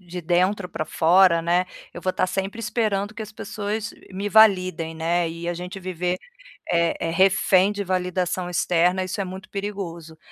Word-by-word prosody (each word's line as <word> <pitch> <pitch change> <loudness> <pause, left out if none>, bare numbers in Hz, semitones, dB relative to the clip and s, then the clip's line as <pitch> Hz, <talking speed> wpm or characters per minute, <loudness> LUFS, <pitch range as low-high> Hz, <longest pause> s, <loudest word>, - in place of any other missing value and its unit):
de 180 -1 -7
dentro 180 +3 +1
pra 155 - -4
fora, 170 +1 +4
né, 175 +2 +2 0.3
eu - - -8
vou 185 - 0
estar 185 - 0
sempre 195 +4 -3
esperando 215 -2 -1
que 220 - -10
as 215 -1 -6
pessoas 210 +1 -4 0.2
me 200 +2 -3
validem, 185 -6 +4
né, 165 +1 0
e 170 +1 -6
a 175 - -1
gente 180 +2 -7
viver, 180 0 -2 0.5
é 170 -1 +2
é - - -1
refém 190 +2 +4
de 205 0 -3
validação 180 -1 -1
externa 180 +1 +2
isso 185 +2 -4
é - - -3
muito 190 +2 -8
perigoso. 175 -6 -6
185 Hz, 175 wpm, -23 LUFS, 175-200 Hz, 0.5 s, fora